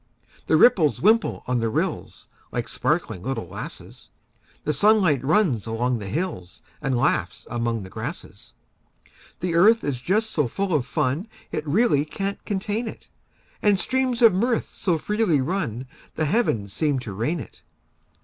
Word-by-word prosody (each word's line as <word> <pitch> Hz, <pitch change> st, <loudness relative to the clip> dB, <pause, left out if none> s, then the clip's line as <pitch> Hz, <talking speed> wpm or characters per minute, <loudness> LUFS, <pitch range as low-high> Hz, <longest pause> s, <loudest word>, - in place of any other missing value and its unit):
The 160 Hz, -, +4 dB
ripples 165 Hz, -, +5 dB
wimple 220 Hz, +4 st, +2 dB
on 125 Hz, -1 st, 0 dB
the 115 Hz, -1 st, 0 dB
rills, -, -, -3 dB, 0.2 s
Like -, -, -3 dB
sparkling 90 Hz, -, -1 dB
little 130 Hz, -6 st, -3 dB
lasses; -, -, -9 dB, 0.5 s
The 150 Hz, -, 0 dB
sunlight 180 Hz, -, +3 dB
runs 145 Hz, -, +2 dB
along 120 Hz, +2 st, 0 dB
the 100 Hz, -, -6 dB
hills, 110 Hz, -, -4 dB, 0.2 s
And 130 Hz, -2 st, 0 dB
laughs 120 Hz, -, 0 dB
among 115 Hz, -2 st, -1 dB
the 95 Hz, -, -9 dB
grasses. -, -, -7 dB, 0.9 s
The 175 Hz, -1 st, -1 dB
earth 215 Hz, +7 st, +5 dB
is 135 Hz, -4 st, -2 dB
just 215 Hz, -, 0 dB
so 150 Hz, -5 st, +1 dB
full 195 Hz, +9 st, -2 dB
of 140 Hz, -5 st, +1 dB
fun 150 Hz, -, -1 dB, 0.2 s
It 155 Hz, 0 st, -3 dB
really 160 Hz, -3 st, +3 dB
can't 195 Hz, +6 st, -4 dB
contain 210 Hz, +3 st, -2 dB
it; -, -, -9 dB, 0.5 s
And 205 Hz, -2 st, +3 dB
streams 260 Hz, -1 st, 0 dB
of 225 Hz, -4 st, +8 dB
mirth 230 Hz, +5 st, 0 dB
so 175 Hz, -4 st, 0 dB
freely 210 Hz, -3 st, +1 dB
run 130 Hz, -, -2 dB, 0.3 s
The 155 Hz, -, 0 dB
heavens 130 Hz, -, 0 dB
seem 150 Hz, -4 st, +1 dB
to 110 Hz, -5 st, -6 dB
rain 120 Hz, -, -1 dB
it. -, -, -11 dB
155 Hz, 155 wpm, -24 LUFS, 125-205 Hz, 0.9 s, of